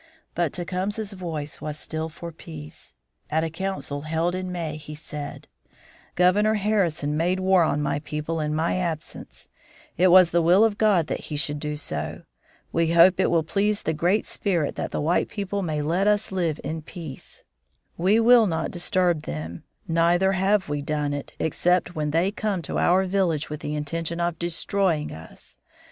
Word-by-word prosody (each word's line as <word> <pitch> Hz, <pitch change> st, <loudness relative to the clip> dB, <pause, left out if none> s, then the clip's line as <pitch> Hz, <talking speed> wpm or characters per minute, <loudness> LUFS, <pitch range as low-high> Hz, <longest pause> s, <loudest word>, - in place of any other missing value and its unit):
But 170 Hz, -4 st, 0 dB
Tecumseh's 195 Hz, +4 st, -3 dB
voice 160 Hz, -6 st, -5 dB
was 150 Hz, 0 st, -4 dB
still 160 Hz, +1 st, -4 dB
for 170 Hz, +2 st, -8 dB
peace. 80 Hz, -, -10 dB, 0.3 s
At 160 Hz, +1 st, +1 dB
a 165 Hz, -, -2 dB
council 190 Hz, -5 st, -4 dB
held 160 Hz, +3 st, -1 dB
in 185 Hz, 0 st, -3 dB
May, 165 Hz, -4 st, -3 dB
he 150 Hz, 0 st, -9 dB
said: 150 Hz, -1 st, -7 dB, 0.7 s
"Governor 205 Hz, +5 st, +4 dB
Harrison 180 Hz, -8 st, 0 dB
made 175 Hz, +4 st, +1 dB
war 190 Hz, -1 st, +4 dB
on 150 Hz, -2 st, +1 dB
my 145 Hz, -, 0 dB
people 150 Hz, +2 st, -4 dB
in 150 Hz, 0 st, -1 dB
my 160 Hz, +3 st, 0 dB
absence; 170 Hz, -4 st, -5 dB, 0.5 s
it 185 Hz, -, +6 dB
was 180 Hz, -1 st, +7 dB
the 170 Hz, -, +3 dB
will 180 Hz, +6 st, +5 dB
of 220 Hz, -2 st, +1 dB
God 205 Hz, -7 st, +4 dB
that -, -, -4 dB
he 150 Hz, -, -3 dB
should 145 Hz, 0 st, -2 dB
do 150 Hz, 0 st, -3 dB
so. 145 Hz, -, -5 dB, 0.5 s
We 165 Hz, 0 st, +2 dB
hope 175 Hz, +2 st, +6 dB
it 190 Hz, -, +3 dB
will 165 Hz, -2 st, +2 dB
please 205 Hz, +5 st, 0 dB
the 160 Hz, -, 0 dB
Great 175 Hz, +7 st, +1 dB
Spirit 170 Hz, -8 st, -1 dB
that -, -, -4 dB
the -, -, -3 dB
white 160 Hz, +4 st, +1 dB
people 200 Hz, -1 st, -3 dB
may 155 Hz, -5 st, -2 dB
let 175 Hz, +6 st, +1 dB
us 210 Hz, 0 st, +2 dB
live 170 Hz, -5 st, -1 dB
in 160 Hz, +3 st, -4 dB
peace. 155 Hz, -3 st, -9 dB, 0.5 s
We 195 Hz, +6 st, +3 dB
will 230 Hz, -1 st, +6 dB
not 160 Hz, -2 st, -2 dB
disturb 175 Hz, -2 st, +1 dB
them, 80 Hz, -, -6 dB, 0.2 s
neither 170 Hz, +3 st, +3 dB
have 195 Hz, 0 st, +2 dB
we 145 Hz, -1 st, -2 dB
done 145 Hz, 0 st, -1 dB
it, 145 Hz, -1 st, -6 dB
except 175 Hz, +2 st, +1 dB
when 150 Hz, -2 st, -2 dB
they 170 Hz, +6 st, +2 dB
come 205 Hz, -4 st, -2 dB
to -, -, -2 dB
our 185 Hz, +2 st, +3 dB
village 180 Hz, -6 st, 0 dB
with 150 Hz, -, -4 dB
the 150 Hz, 0 st, -4 dB
intention 165 Hz, +3 st, -3 dB
of 170 Hz, -1 st, -1 dB
destroying 170 Hz, -1 st, 0 dB
us. 80 Hz, 0 st, -13 dB
170 Hz, 180 wpm, -25 LUFS, 150-185 Hz, 0.7 s, was